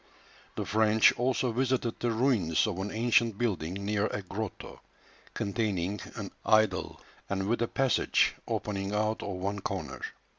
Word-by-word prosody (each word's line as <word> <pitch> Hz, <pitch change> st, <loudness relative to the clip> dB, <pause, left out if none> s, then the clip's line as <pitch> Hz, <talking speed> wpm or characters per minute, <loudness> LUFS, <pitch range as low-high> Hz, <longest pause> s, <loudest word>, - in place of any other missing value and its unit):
The -, -, -3 dB
French 110 Hz, 0 st, +5 dB
also 125 Hz, 0 st, 0 dB
visited 125 Hz, -1 st, 0 dB
the 120 Hz, -, 0 dB
ruins 115 Hz, -, +2 dB
of 100 Hz, -4 st, -3 dB
an 95 Hz, +2 st, -2 dB
ancient 115 Hz, -1 st, +2 dB
building 95 Hz, -8 st, -1 dB
near 105 Hz, +1 st, +1 dB
a 105 Hz, -, -4 dB
grotto, 100 Hz, +2 st, -6 dB, 0.5 s
containing 100 Hz, -2 st, -1 dB, 0.2 s
an -, -, -5 dB
idol, 110 Hz, -4 st, +2 dB, 0.3 s
and 95 Hz, -1 st, -1 dB
with 120 Hz, +2 st, +1 dB
a 120 Hz, -, +2 dB
passage 135 Hz, 0 st, +2 dB
opening 100 Hz, 0 st, -2 dB
out 110 Hz, +1 st, 0 dB
of -, -, -4 dB
one 100 Hz, +2 st, -2 dB
corner. -, -, -4 dB
105 Hz, 145 wpm, -29 LUFS, 100-115 Hz, 0.5 s, French